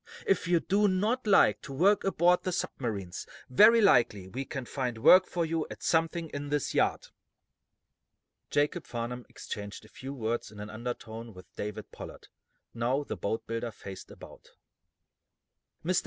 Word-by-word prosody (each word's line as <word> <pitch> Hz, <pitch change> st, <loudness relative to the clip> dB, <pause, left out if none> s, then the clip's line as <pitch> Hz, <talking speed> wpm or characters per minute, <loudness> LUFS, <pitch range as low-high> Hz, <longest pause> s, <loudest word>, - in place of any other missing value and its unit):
If 190 Hz, -3 st, +1 dB
you 175 Hz, -1 st, +4 dB
do 205 Hz, +5 st, +2 dB
not 215 Hz, +6 st, 0 dB
like 105 Hz, -, +5 dB
to -, -, -9 dB
work 190 Hz, +9 st, +3 dB
aboard 180 Hz, -2 st, +3 dB
the 185 Hz, -, -2 dB
submarines, 100 Hz, -, -4 dB, 0.2 s
very 220 Hz, -, +7 dB
likely 115 Hz, -, +4 dB
we 135 Hz, +6 st, -4 dB
can 135 Hz, -1 st, -5 dB
find 125 Hz, -4 st, -3 dB
work 185 Hz, +11 st, +7 dB
for 170 Hz, -2 st, -1 dB
you 160 Hz, -1 st, -2 dB
at -, -, -9 dB
something 165 Hz, 0 st, +1 dB
in 145 Hz, 0 st, -5 dB
this 145 Hz, -1 st, -1 dB
yard." -, -, +1 dB, 1.4 s
Jacob 150 Hz, +3 st, 0 dB
Farnum 120 Hz, +1 st, -5 dB
exchanged 105 Hz, 0 st, -7 dB
a -, -, -17 dB
few 135 Hz, +1 st, -8 dB
words 120 Hz, -4 st, -3 dB
in 105 Hz, -, -12 dB
an 105 Hz, +1 st, -7 dB
undertone 115 Hz, -1 st, -6 dB
with 90 Hz, 0 st, -15 dB
David 105 Hz, 0 st, -6 dB
Pollard. -, -, -10 dB, 0.4 s
Now, 125 Hz, +5 st, 0 dB
the 140 Hz, -, -5 dB
boat 100 Hz, +4 st, -3 dB
builder 115 Hz, +1 st, -3 dB
faced 100 Hz, -3 st, -10 dB
about. -, -, -13 dB, 1.4 s
"Mr. 180 Hz, +1 st, +3 dB
130 Hz, 155 wpm, -29 LUFS, 110-175 Hz, 1.4 s, very